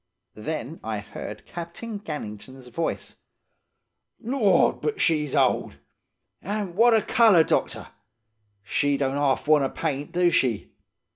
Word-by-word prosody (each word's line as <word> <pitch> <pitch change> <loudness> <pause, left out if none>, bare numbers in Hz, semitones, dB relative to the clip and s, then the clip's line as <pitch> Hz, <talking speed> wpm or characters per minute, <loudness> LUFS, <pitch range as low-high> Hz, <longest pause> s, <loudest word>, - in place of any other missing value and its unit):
Then 155 +5 -5
I 110 -1 -3
heard 105 - -8
Captain 175 +6 -7
Gannington's 130 - -8
voice: 165 +7 -4 1.0
"'Lord, 235 -4 +2
but 440 - -2
she 155 -3 +2
s - - -4
old! - - +1 0.6
An' 205 -2 -3
what 230 +3 +5
a 220 - +2
colour, 220 -9 +5
doctor! - - -1 0.7
She 140 +7 0
don't 135 -1 0
half 140 0 0
want 150 -3 +3
paint, 145 -3 -3
do 175 0 +2
she? 120 -9 0
155 Hz, 125 wpm, -25 LUFS, 135-200 Hz, 1.0 s, what